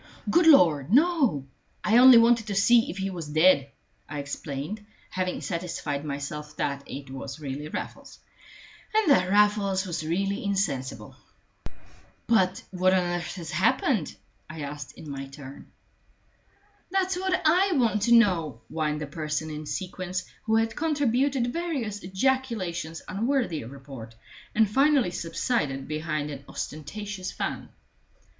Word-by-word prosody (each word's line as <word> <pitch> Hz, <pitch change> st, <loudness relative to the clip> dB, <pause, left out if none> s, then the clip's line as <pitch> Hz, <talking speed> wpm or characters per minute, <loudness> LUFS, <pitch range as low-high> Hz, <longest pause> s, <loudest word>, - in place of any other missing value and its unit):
"Good 340 Hz, 0 st, +4 dB
Lord, 170 Hz, -, +5 dB
no! 270 Hz, -, +3 dB, 0.4 s
I 220 Hz, +2 st, +4 dB
only 255 Hz, -1 st, +10 dB
wanted 230 Hz, -1 st, +4 dB
to 200 Hz, -, -3 dB
see 230 Hz, +4 st, +4 dB
if 180 Hz, -, -6 dB
he 195 Hz, 0 st, -2 dB
was 170 Hz, -4 st, -6 dB
dead," 155 Hz, -2 st, +4 dB, 0.4 s
I 145 Hz, -, -5 dB
explained, 145 Hz, +7 st, -5 dB, 0.3 s
having 185 Hz, -1 st, -2 dB
satisfied 165 Hz, -5 st, -3 dB
myself 150 Hz, +1 st, -6 dB
that 140 Hz, -1 st, -1 dB
it 135 Hz, -1 st, -8 dB
was 135 Hz, +3 st, -7 dB
really 145 Hz, 0 st, -5 dB
Raffles, -, -, -7 dB, 0.8 s
and 435 Hz, -8 st, +4 dB
that 185 Hz, -8 st, +4 dB
Raffles 205 Hz, -1 st, +3 dB
was 170 Hz, -3 st, -3 dB
really 195 Hz, +5 st, -1 dB
insensible. 140 Hz, -, -2 dB, 1.1 s
"But 190 Hz, -5 st, +2 dB
what 185 Hz, 0 st, +3 dB
on 185 Hz, -, +3 dB
earth 175 Hz, 0 st, -3 dB
has 170 Hz, -4 st, -7 dB
happened?" -, -, +1 dB, 0.3 s
I 155 Hz, 0 st, -7 dB
asked 145 Hz, -1 st, -6 dB
in 155 Hz, -, -10 dB
my 135 Hz, -1 st, -6 dB
turn. 135 Hz, 0 st, -12 dB, 1.2 s
"That's 375 Hz, 0 st, 0 dB
what 370 Hz, 0 st, 0 dB
I 365 Hz, +5 st, +4 dB
want 230 Hz, -7 st, +2 dB
to 235 Hz, -, +1 dB
know," 175 Hz, -, +4 dB
whined 155 Hz, -1 st, -2 dB
the -, -, -2 dB
person 155 Hz, +1 st, -3 dB
in 150 Hz, 0 st, -6 dB
sequins, 185 Hz, +4 st, -4 dB, 0.2 s
who 220 Hz, 0 st, +2 dB
had 225 Hz, 0 st, +1 dB
contributed 275 Hz, -4 st, +1 dB
various 280 Hz, -12 st, -3 dB
ejaculations 190 Hz, -6 st, -1 dB
unworthy 230 Hz, -, -1 dB
of 115 Hz, -, -8 dB
report, 135 Hz, -4 st, -10 dB, 0.4 s
and 220 Hz, 0 st, +4 dB
finally 270 Hz, -1 st, +3 dB
subsided 165 Hz, -, -2 dB
behind 155 Hz, -1 st, -3 dB
an 140 Hz, -1 st, -8 dB
ostentatious 190 Hz, +5 st, -6 dB
fan. -, -, -4 dB
185 Hz, 135 wpm, -26 LUFS, 150-230 Hz, 1.2 s, only